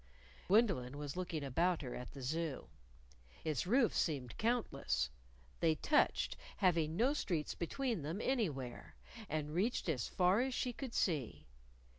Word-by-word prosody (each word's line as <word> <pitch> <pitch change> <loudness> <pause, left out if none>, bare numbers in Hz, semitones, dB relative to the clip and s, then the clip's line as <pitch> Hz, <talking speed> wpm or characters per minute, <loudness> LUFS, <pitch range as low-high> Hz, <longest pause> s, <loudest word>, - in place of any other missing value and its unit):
Gwendolyn 180 - +3
was 145 -1 -5
looking 170 -4 -3
about 165 +5 +1
her 125 - -5
at 125 - -7
the 135 - -8
Zoo. 155 +1 -2 0.7
Its 155 -2 -1
roofs 240 +2 +3
seemed 135 -7 -1
countless. 140 - 0 0.5
They 160 -2 +3
touched, 295 - +2 0.2
having 165 -5 +2
no 255 +7 +4
streets 170 - -1
between 230 - -2
them 160 +7 -3
anywhere, 160 - -2 0.3
and 150 -1 -2
reached 200 +7 0
as 135 -9 0
far 185 +4 +3
as 260 0 -1
she 250 - -1
could 255 -1 -6
see. 150 - 0
165 Hz, 140 wpm, -37 LUFS, 140-220 Hz, 0.7 s, no